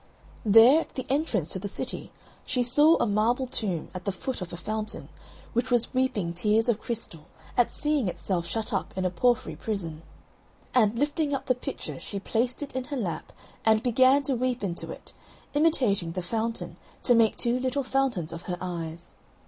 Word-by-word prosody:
There, 225 +7 +8
at - - -11
the 260 - -3
entrance 270 - 0
to 190 - -1
the 200 - -4
city, 200 - -4 0.3
she 250 - 0
saw 295 +7 +5
a - - +2
marble 230 +5 +2
tomb, 200 -9 -3
at 185 -1 -6
the 200 - 0
foot 255 +5 -4
of 180 - -5
a 170 - -6
fountain, 215 +3 -4 0.4
which 240 +2 0
was 245 -2 +2
weeping 255 -10 0
tears 215 +6 +2
of 235 -3 +1
crystal 210 -9 -5 0.3
at 245 - +3
seeing 295 -7 0
itself 175 -1 -2
shut 225 -2 -2
up 195 - -2
in 185 - 0
a 180 - +1
porphyry 240 +7 +1
prison. 170 -8 -4 0.7
And, 225 -3 +3
lifting 290 +1 +1
up 270 0 -5
the 255 - +3
pitcher, 250 - -6
she 200 - -4
placed 240 +7 -1
it 280 - -8
in 260 -1 -2
her 285 - -4
lap 175 -9 -3 0.3
and 220 0 +4
began 260 +3 +5
to 275 - 0
weep 250 -1 -1
into 175 -3 -3
it, - - -9 0.4
imitating 250 - +2
the 185 - -3
fountain 225 +5 -2 0.3
to 245 - +5
make 230 -2 +4
two 240 +1 +1
little 260 +2 0
fountains 250 -12 0
of 165 - -6
her 180 - -1
eyes. 170 -2 -6
225 Hz, 190 wpm, -27 LUFS, 185-255 Hz, 0.7 s, There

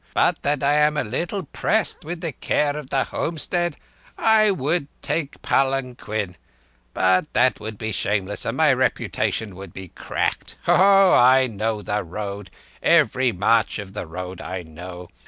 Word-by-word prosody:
"But - - +2
that 145 -1 0
I 140 +1 +3
am 150 0 +3
a - - +1
little 170 - -3
pressed 210 +7 -1
with 165 +2 -6
the 165 - -2
care 145 +1 0
of 150 -3 -7
the 135 - +1
homestead 175 +2 -2 0.4
I 220 -1 +4
would 155 -3 0 0.2
take 155 -4 -2
palanquin... 125 -8 -1 0.6
but 95 +9 +2
that 130 - +3
would 110 0 -7
be 110 +1 -3
shameless, 100 0 -1
and 115 +3 -2
my 155 -3 +5
reputation 120 -5 -1
would 95 -2 -10
be 95 -2 -9
cracked. - - -3
Ho! - - +3
Ho! 195 0 +6
I 130 +2 +6
know 110 -2 -3
the 105 +3 -1
road—every 100 +6 0
march 110 +4 +2
of 100 -2 -8
the 100 - -5
road 90 +2 -7
I 90 -1 -5
know. 90 +2 -9
125 Hz, 155 wpm, -22 LUFS, 100-150 Hz, 0.6 s, Ho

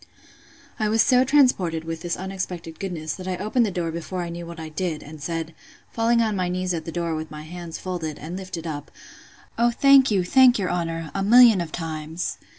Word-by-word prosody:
I 215 -1 +1
was 220 0 +4
so 250 0 +4
transported 250 - +3
with 165 0 -5
this 175 -1 -2
unexpected 180 -3 -5
goodness, 160 -6 -4
that 185 - -8
I 185 -1 -2
opened 215 +4 +1
the - - -1
door 175 -3 -2
before 170 +2 -4
I 170 - -5
knew 170 0 -7
what 170 0 -9
I 160 - -6
did; 160 0 -3
and 150 0 -11
said, 165 +1 -4 0.4
falling 230 +1 +2
on 215 -2 0
my 180 -2 -1
knees 180 0 -1
at 160 -2 -4
the 165 - -5
door, 170 -1 -2
with 155 0 -4
my 150 0 -8
hands 170 +1 -7
folded, 170 -5 -4
and 165 +4 -7
lifted 185 -3 -6
up, 145 -3 -5 0.7
O 235 +1 +4
thank 275 +2 +5
you, 195 -4 +2
thank 255 +6 +5
your 190 -4 -1
honour, 165 -2 -3
a 195 - -2
million 225 -1 +7
of 165 -2 -5
times! 160 0 -4
175 Hz, 215 wpm, -24 LUFS, 165-200 Hz, 0.7 s, million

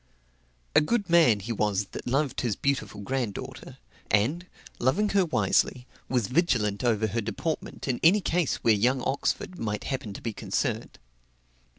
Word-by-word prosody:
A - - +7
good 200 +2 0
man 155 -12 +5
he 115 +5 -5
was, 105 -2 0
that - - -7
loved 135 +2 0
his 115 -5 0
beautiful 110 -7 -2
granddaughter; 120 -2 -4 0.3
and, 145 - +1 0.3
loving 185 +13 +2
her 195 -1 +3
wisely, 130 -5 +1 0.2
was 125 -4 +1
vigilant 120 - +1
over 110 -3 +2
her 110 +2 -1
deportment 155 +10 -4
in 125 -2 0
any 180 +6 +6
case 175 -5 0
where 115 - +5
young 125 +5 +2
Oxford 140 +6 -2
might 105 -2 -3
happen 130 -6 -4
to - - -9
be 115 - -3
concerned. - - -2
125 Hz, 155 wpm, -27 LUFS, 105-155 Hz, 0.3 s, A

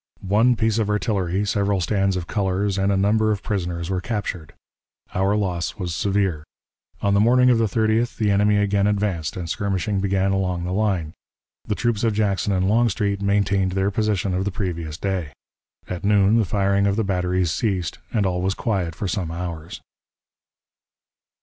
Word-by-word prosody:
One 115 +6 +4
piece 110 0 +1
of 105 -2 0
artillery, 100 -2 0
several 100 -1 +1
stands 95 +1 +1
of 90 -2 -3
colors, 100 0 -1
and 95 +1 +2
a 100 - +2
number 110 +3 +2
of 100 -2 -3
prisoners 90 -3 -3
were 95 -1 -1
captured. 90 -6 -4 0.6
Our 95 +2 +1
loss 90 -5 -1
was 90 -4 -3
severe. 95 -4 0 0.6
On 100 -1 +2
the 100 - +4
morning 125 +3 +5
of 120 - +3
the 115 - +3
30th 110 +3 0
the 105 -2 +1
enemy 105 +1 +3
again 100 0 +2
advanced, 100 -7 -1
and 90 -2 -4
skirmishing 100 +2 -1
began 95 0 +1
along 90 -3 -1
the 90 - -3
line. 95 -6 0 0.5
The 105 - -1
troops 120 -2 -1
of 115 -2 +1
Jackson 100 -2 0
and 95 -1 +1
Longstreet 105 -2 +1
maintained 100 -2 +1
their 95 +1 +1
position 105 -2 0
of 95 +1 0
the 100 - -1
previous 85 -6 -4
day. 90 -7 -3 0.5
At 90 0 -5
noon 100 +1 +4
the 110 - +2
firing 100 +1 +1
of 100 - +1
the 110 - 0
batteries 90 -3 0
ceased, 95 -3 -2
and 105 -3 +1
all 90 -1 0
was 95 +1 0
quiet 95 -8 -2
for 100 - -3
some 90 -3 -2
hours. 85 -1 -6
100 Hz, 175 wpm, -22 LUFS, 90-105 Hz, 0.6 s, morning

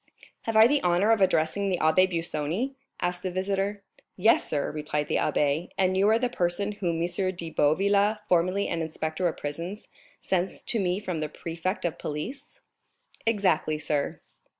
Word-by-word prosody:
"Have 225 - -1
I 220 0 +9
the 285 +4 +3
honor 180 +5 +3
of 225 -3 +3
addressing 190 +2 +2
the 185 - +1
Abbé 185 +4 +4
Busoni?" 170 - -2 0.3
asked 180 0 -1
the 185 - -2
visitor. 195 +2 -2 0.3
"Yes, 220 +5 +3
sir," 145 -2 -1
replied 150 -1 -2
the - - +2
abbé; 150 +4 +1
"and 185 -1 +2
you 195 +2 +4
are 220 - +5
the 250 +2 +1
person 200 -3 -1
whom 175 -5 -2
M. 180 +2 0
de 170 -2 -5
Boville, 200 +8 +3
formerly 185 +3 +2
an 165 - -2
inspector 160 +2 -2
of 165 - -3
prisons, 170 +8 -5 0.3
sends 185 0 -2
to 230 - -1
me 185 -1 0
from 185 -6 -4
the 155 -1 -2
prefect 170 +5 -4
of 170 - -2
police?" 265 - -6 0.7
"Exactly, 185 -8 +2
sir." 150 -2 -2
180 Hz, 170 wpm, -27 LUFS, 160-200 Hz, 0.7 s, I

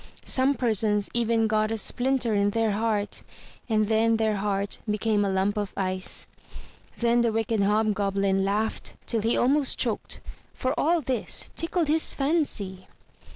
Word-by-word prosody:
Some 270 +2 +3
persons 215 -4 +1
even 230 -1 +2
got 215 0 +1
a 225 - -2
splinter 245 +1 +1
in 200 0 +2
their 225 +1 +1
heart, 210 -1 -1 0.5
and 215 -1 +2
then 225 +1 +2
their 220 -2 +1
heart 200 0 -1
became 210 0 +1
a 200 - 0
lump 195 +2 0
of 205 -1 -3
ice. 185 -1 -1 0.7
Then 235 0 +2
the 235 -1 +2
wicked 225 -1 0
Hobgoblin 200 -2 +1
laughed 210 +3 -2
till 225 - 0
he 225 +2 +1
almost 275 +2 +2
choked, - - -2 0.4
for 260 +1 -1
all 335 +2 +2
this 255 -4 -1
tickled 330 0 -1
his 315 +2 +1
fancy. 275 - -2
220 Hz, 150 wpm, -26 LUFS, 205-240 Hz, 0.7 s, Some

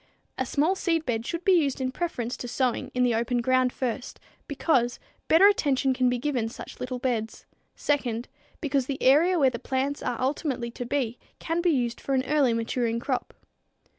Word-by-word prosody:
A 260 - 0
small 305 +8 +2
seedbed 315 -11 -1
should 340 0 -4
be 385 - +5
used 295 -8 +3
in 260 -1 -1
preference 255 -7 -3
to 245 - -6
sowing 250 0 -1
in 250 - +2
the 245 -1 +3
open 235 +2 0
ground 255 +1 +2
first, 250 +1 -4 0.3
because 260 -4 +1 0.3
better 330 +5 +6
attention 275 -9 +2
can 255 -1 +2
be 245 - 0
given 245 -4 -1
such - - -10
little 250 0 -3
beds; 235 -3 -3 0.3
second, 245 -5 -1 0.3
because 275 -4 0
the 275 -1 -3
area 325 +8 +5
where 270 -5 +4
the 235 - -5
plants 270 +3 -2
are 240 - -2
ultimately 260 -3 -1
to 245 0 -6
be 245 -4 -1 0.2
can 330 +1 -2
be 350 - +2
used 245 -6 0
for 275 - -1
an 260 0 +1
early 290 -5 +3
maturing 230 0 -1
crop. 255 +1 -2
260 Hz, 185 wpm, -26 LUFS, 240-290 Hz, 0.3 s, better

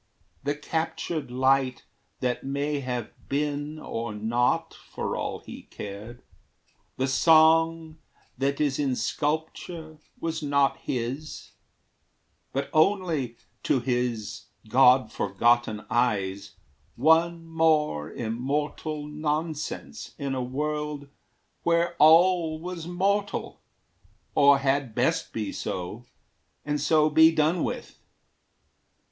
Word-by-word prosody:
The 145 +1 -1
captured 160 -1 -3
light 130 +1 +2 0.4
That 125 -1 -1
may 140 +2 -1
have 125 -4 -4 0.2
been 145 +1 -2
or 115 -7 -5
not, 115 +4 0
for - - -5
all - - -3
he - - -11
cared, 105 +4 -8 0.7
The 130 - 0
song 160 +2 +4 0.4
that 140 +2 -1
is 145 -2 +1
in 135 -3 +1
sculpture 155 +4 -3 0.2
was 165 -1 -3
not 140 -2 +2
his, 130 +5 -5 1.0
But 135 +1 -3
only, 160 - +1 0.2
to 130 - +2
his 120 -3 -2 0.2
God 130 +2 +5
forgotten 110 +2 +1
eyes, 100 -5 -1 0.4
One 165 +4 +3
more 155 - +1
immortal 145 +6 -3
nonsense 155 +1 -4
in 140 -2 -3
a 130 - -1
world 150 +2 -3 0.5
Where 170 0 +1
all 165 0 +5
was 170 -1 -6
mortal, 200 +3 -1 0.7
or 140 0 +6
had 135 -3 0
best - - 0
be 110 -3 -3
so, 95 +6 -5 0.6
And 150 -1 -1
so 155 +1 +4
be 160 +1 +6
done 160 +2 +1
with. - - -5
145 Hz, 105 wpm, -26 LUFS, 125-160 Hz, 1.0 s, or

